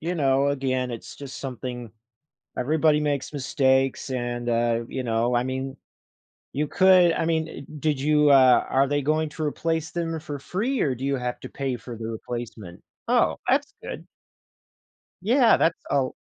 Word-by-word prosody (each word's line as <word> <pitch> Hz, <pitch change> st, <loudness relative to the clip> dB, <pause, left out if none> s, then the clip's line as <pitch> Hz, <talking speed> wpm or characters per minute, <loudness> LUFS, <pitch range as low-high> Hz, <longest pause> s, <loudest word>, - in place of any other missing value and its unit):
you 170 Hz, +3 st, -2 dB
know, 140 Hz, -2 st, +2 dB
again, 130 Hz, -2 st, -1 dB
it's 115 Hz, -2 st, -8 dB
just 140 Hz, -2 st, -8 dB
something 125 Hz, -3 st, -6 dB, 0.7 s
everybody 150 Hz, +3 st, +2 dB
makes 145 Hz, -1 st, -2 dB
mistakes 135 Hz, -1 st, +1 dB
and, 120 Hz, -1 st, -3 dB
uh, 115 Hz, 0 st, +1 dB
you 130 Hz, -, -4 dB
know, 115 Hz, +1 st, +1 dB
I 120 Hz, -, +2 dB
mean, 130 Hz, +1 st, -4 dB, 0.8 s
you 150 Hz, +2 st, -1 dB
could 185 Hz, +1 st, +5 dB
I 165 Hz, -, -1 dB
mean, 160 Hz, -1 st, 0 dB
eh, -, -, -9 dB, 0.2 s
did 150 Hz, -2 st, 0 dB
you, 150 Hz, +1 st, +4 dB
uh, 130 Hz, -3 st, +6 dB
are 135 Hz, +1 st, +3 dB
they 145 Hz, 0 st, 0 dB
going 155 Hz, +2 st, +1 dB
to 155 Hz, +1 st, -7 dB
replace 160 Hz, +1 st, -1 dB
them 165 Hz, -1 st, -3 dB
for 145 Hz, -2 st, -6 dB
free 220 Hz, -, -2 dB
or 135 Hz, -, +1 dB
do 125 Hz, +2 st, -7 dB
you 140 Hz, 0 st, +1 dB
have 125 Hz, -1 st, -4 dB
to -, -, -8 dB
pay 135 Hz, -2 st, -3 dB
for 120 Hz, 0 st, -9 dB
the 110 Hz, 0 st, -6 dB
replacement? 115 Hz, -5 st, -7 dB, 0.3 s
Oh, -, -, +3 dB
that's -, -, +2 dB
good. -, -, -7 dB, 1.2 s
Yeah. 235 Hz, +4 st, +5 dB
That's 165 Hz, -, +2 dB, 0.2 s
Oh 135 Hz, -2 st, +1 dB
135 Hz, 170 wpm, -25 LUFS, 125-155 Hz, 1.2 s, uh